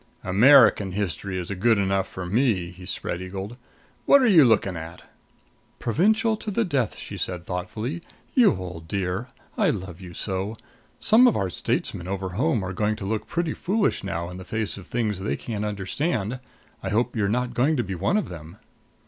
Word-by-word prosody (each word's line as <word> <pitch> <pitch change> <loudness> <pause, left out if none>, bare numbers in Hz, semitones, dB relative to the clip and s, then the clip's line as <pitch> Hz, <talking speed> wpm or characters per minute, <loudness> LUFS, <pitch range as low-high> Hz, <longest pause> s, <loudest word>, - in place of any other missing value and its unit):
"American 105 -1 +6
history 100 -1 -3
is 90 +1 -4
good 110 +4 +3
enough 95 -1 +1
for 95 - -7
me," 100 -3 +1
he 90 0 -12
spread 90 -2 -3
eagled. 95 +4 -6 0.5
"What 280 - +8
are - - +5
you 175 -8 +7
looking 110 -6 +3
at?" 80 +1 -8 0.7
"Provincial 220 - +2
to 215 - -5
the 225 +3 +1
death!" 130 - -1
she - - -7
said 90 -1 -4
thoughtfully. 110 - -4 0.3
"You 245 - +5
old 90 -3 -7
dear 95 +4 -2 0.3
I - - +4
love 90 -1 -4
you 90 -2 -10
so! 95 +2 -3 0.4
Some 235 +4 +6
of 240 - +3
our 95 -3 -1
statesmen 85 +1 -2
over 95 0 -3
home 115 - 0
are 95 0 -4
going 105 +2 0
to 100 - -7
look 110 +2 -2
pretty 170 +2 -1
foolish 205 - 0
now 85 -3 -3
in 90 +1 -8
the 95 - -8
face 110 +3 -2
of 95 -3 -11
things 110 -5 -1
they 100 - -2
can't 105 -3 -4
understand, 105 - -2 0.4
I - - -3
hope 120 +3 0
you're 100 -3 +1
not 125 +2 -1
going 140 +6 +2
to 120 - +1
be 95 - -5
one 95 - +1
of 215 - -1
them." 85 +2 -10
100 Hz, 190 wpm, -25 LUFS, 95-125 Hz, 0.7 s, What